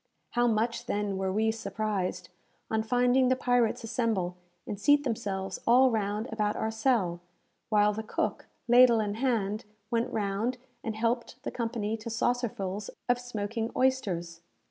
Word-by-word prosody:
How 240 0 +2
much, 230 +2 0
then, 205 -1 -1
were 190 0 0
we 220 +3 +2
surprised, 215 -4 -3 0.4
on 220 0 +2
finding 245 +3 +3
the 260 - +4
pirates 245 -3 +1
assemble 220 -6 -1 0.3
and 205 - -5
seat 290 +5 +5
themselves 195 -6 -3
all 255 +2 +6
round 210 +1 -1
about 210 -1 0
our 220 - -1
cell, 220 -7 +1 0.5
while 210 -1 +4
the 220 - -3
cook, 220 - -2 0.2
ladle 240 -1 +7
in 205 -1 -1
hand, 220 -3 0 0.3
went 230 0 0
round, 215 +4 -1 0.3
and 220 -1 -3
helped 235 +3 -2
the - - -3
company 225 -2 -2
to 225 +1 -7
saucerfuls 220 -4 -1 0.2
of 245 0 +2
smoking 225 -1 -3
oysters. 185 -11 0
220 Hz, 145 wpm, -29 LUFS, 205-245 Hz, 0.5 s, ladle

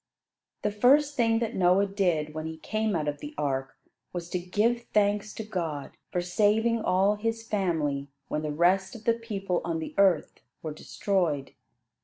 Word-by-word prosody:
The 210 - +1
first 280 +7 +4
thing 230 -3 +3
that 230 -1 -1
Noah 185 +2 +4
did 175 -7 0
when 155 0 -4
he 160 0 -6
came 215 +4 -1
out 155 -2 -1
of 145 0 -2
the 295 0 -8
ark, 135 -1 -2 0.4
was 175 -1 -5
to 180 - 0
give 220 +7 0
thanks 205 0 +2
to 220 - -4
God 165 -9 -4 0.2
for 180 - 0
saving 220 +5 +2
all 195 +1 +2
his 225 +1 -2
family 160 -9 0 0.2
when 150 - -2
the 155 -1 -2
rest 185 - +2
of 225 - -10
the 230 - +4
people 200 -6 -2
on 165 -1 -1
the 160 - -5
earth 185 -6 +3 0.2
were 155 -2 -4
destroyed. 160 -4 -1
195 Hz, 175 wpm, -28 LUFS, 160-220 Hz, 0.4 s, first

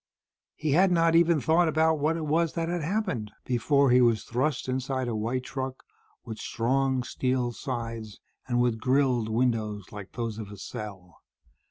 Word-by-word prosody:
He 150 -1 -2
had 180 +6 +4
not 165 -1 +3
even 170 -1 +5
thought 165 +4 +3
about 160 0 +2
what 155 +3 +1
it 160 - -3
was 160 +2 +1
that 165 -1 -2
had 175 -1 -1
happened, 160 - -2
before 135 +2 +2
he 125 +1 +6
was 115 -3 +3
thrust 130 +3 -1
inside 130 0 -2
a 115 - -2
white 120 +4 -1
truck, 130 0 -5 0.4
with 110 -2 -7
strong 130 +2 0
steel 125 0 -1
sides 115 -4 -5 0.3
and 120 -1 +1
with 120 -2 +1
grilled 130 -2 +2
windows 110 -4 -1
like 100 -2 -9
those 115 -3 -4
of 105 -2 -6
a 105 - -10
cell. 95 -3 -8
130 Hz, 170 wpm, -27 LUFS, 115-155 Hz, 0.4 s, he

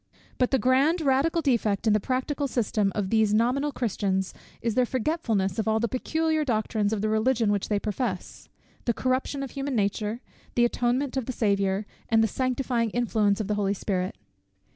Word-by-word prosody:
_ - - -32
But 250 - +3
the 265 - +3
grand 270 +7 +3
radical 300 +4 +2
defect 230 -7 +1
in 215 - +4
the 210 - +3
practical 265 +5 -1
system 215 -5 0
of 200 -3 -2
these 220 -2 +3
nominal 255 +6 +1
Christians, 195 -6 -1 0.3
is 230 -1 -1
their 255 - +3
forgetfulness 230 - -1
of 220 - -1
all 220 0 +2
the 235 - +1
peculiar 315 +6 0
doctrines 215 -4 0
of 215 -2 -1
the 215 - 0
Religion 220 0 +2
which 205 -2 -1
they 210 - +2
profess 205 -2 -4 0.4
the 235 - +1
corruption 260 +2 -1
of 270 - -6
human 275 -1 -3
nature 210 +1 -1 0.4
the 240 - +4
atonement 250 +3 0
of 260 - -2
the - - -1
Saviour 200 -3 0 0.2
and 225 0 +4
the - - +3
sanctifying 250 0 -1
influence 215 -3 +1
of 215 - -2
the 210 - 0
Holy 200 -1 0
Spirit. 185 -1 -2
230 Hz, 185 wpm, -26 LUFS, 210-260 Hz, 0.4 s, in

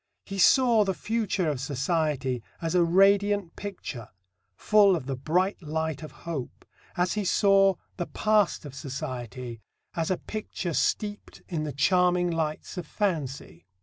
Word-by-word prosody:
He 195 -1 -5
saw 235 0 +5
the 190 -2 -1
future 215 -5 -1
of 145 -4 -1
society 135 -2 -1 0.2
as 165 -1 -2
a 180 -1 +4
radiant 195 +1 +3
picture, 180 - -7 0.5
full 205 - +5
of 155 - -4
the 135 0 -3
bright 180 +10 0
light 160 -1 -3
of 155 - -8
hope, 155 -7 -5 0.3
as 180 +1 +1
he 210 - -1
saw 195 0 +4 0.2
the 175 - -3
past 215 -6 +1
of 145 - -8
society 125 -3 -6 0.3
as 165 -1 -1
a 185 - +1
picture 205 -5 -5
steeped 205 +6 -2
in 160 -4 -2
the 150 - -3
charming 180 +4 +2
lights 160 +1 -3
of 170 - -7
fancy. 140 - -3
170 Hz, 150 wpm, -27 LUFS, 145-195 Hz, 0.5 s, saw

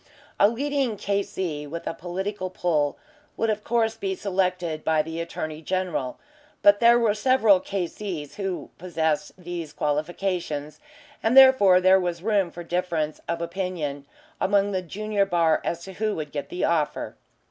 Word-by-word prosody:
A 205 - +6
leading 270 -1 -1
K.C. 190 -7 -2
with 165 +3 -6
a - - -2
political 185 +3 -4
pull 155 -5 0 0.4
would 225 -1 +1
of 210 0 -3
course 225 -1 +1
be 190 -1 -3
selected 180 -5 -1
by 160 -1 +2
the 160 +1 -5
Attorney 155 -2 -5
General, 180 -7 -2 0.5
but 205 0 +7
there 235 0 +6
were 230 -3 +3
several 220 -3 +4
K.C.'s 180 -5 -4
who 195 -3 -4
possessed 160 -4 -1
these 175 -4 -6
qualifications, 155 0 -2 0.4
and 225 +4 +2
therefore 260 -9 +8
there 185 +1 +5
was 175 -1 -3
room 205 -4 +2
for 175 +1 -9
differences 170 -3 -2
of 170 0 -1
opinion 170 -6 -4 0.3
among 200 +1 +2
the 185 -2 -1
junior 205 +3 -1
bar 165 -4 +2
as 170 0 -3
to 190 - -9
who 215 +2 -1
would 150 -2 -5
get 145 -2 -5
the 180 - -3
offer. 160 -3 -1
180 Hz, 155 wpm, -25 LUFS, 160-205 Hz, 0.5 s, therefore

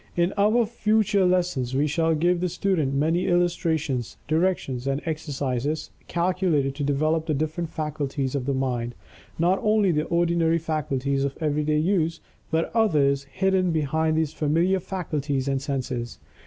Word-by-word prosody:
In 175 +2 +1
our 215 +4 +3
future 215 -3 +2
lessons 175 -9 0
we 140 +2 +2
shall 160 +2 +1
give 175 +3 +1
the 180 - 0
student 160 -7 0
many 160 +5 +1
illustrations, 160 -7 0
directions, 155 -6 0
and 135 +1 0
exercises 145 -2 -2 0.2
calculated 170 -6 +1
to 145 +1 -4
develop 155 +3 +1
the 155 - +1
different 155 +3 -2
faculties 145 -4 -3
of 140 -2 -2
the 140 - +1
mind 120 -3 -2 0.4
not 175 +4 +2
only 210 -3 +3
the 150 -1 0
ordinary 170 -1 +2
faculties 140 -4 -1
of 140 0 -2
everyday 150 -1 0
use, 165 0 +1 0.3
but 160 +1 0
others 145 -11 +2
hidden 185 +5 +1
behind 160 0 +1
these 160 -1 0
familiar 165 +5 +1
faculties 150 -7 -3
and 135 -1 0
senses. 130 -4 -3
155 Hz, 145 wpm, -25 LUFS, 140-175 Hz, 0.4 s, our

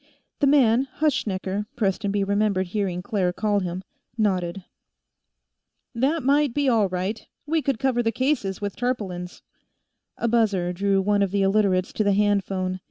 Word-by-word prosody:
The 285 - +3
man 265 -2 +4
Hutschnecker, 210 -9 -1
Prestonby 200 -2 0
remembered 200 -1 +1
hearing 185 -3 -2
Claire 195 -6 0
call 205 +2 0
him 180 0 -4 0.3
nodded. 185 -4 0 1.3
"That 275 +7 0
might 280 -1 +2
be 290 -1 +1
all 220 -6 +3
right. 185 +4 -3 0.2
We 315 +2 0
could 275 -4 -1
cover 260 -2 +1
the 225 -1 0
cases 240 -6 -1
with 205 -1 -4
tarpaulins." 195 -8 -4 0.7
A 235 - -1
buzzer 205 -6 +1
drew 195 +1 +1
one 205 +1 +2
of 200 - +2
the 200 +1 0
Illiterates 195 -2 +2
to 215 - 0
a - - +3
handphone. 195 -2 0
205 Hz, 150 wpm, -24 LUFS, 190-240 Hz, 1.3 s, man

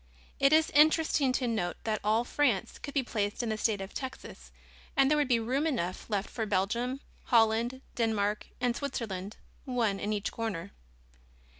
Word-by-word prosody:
It 275 0 +5
is 315 +1 +4
interesting 305 -2 +4
to 255 -1 0
note 180 -7 -1
that 215 -2 -1
all 215 +3 +2
France 245 -6 0
could 285 - -8
be 275 - +2
placed 210 -1 -2
in 235 - -2
the 220 - -1
state 210 -3 +1
of 195 - -7
Texas 260 -1 -7 0.5
and 270 +1 +5
there 300 - +4
would 290 - +2
be 240 -3 +3
room 260 +7 0
enough 185 - -2
left 205 -2 -1
for 225 -2 -4
Belgium, 235 +7 0 0.2
Holland, 230 +2 +3
Denmark 210 -3 0
and 245 -1 +1
Switzerland, 220 -8 -4 0.3
one 235 -7 0
in 210 - -2
each 210 -1 -1
corner. 200 -5 -4
230 Hz, 170 wpm, -30 LUFS, 210-265 Hz, 0.5 s, It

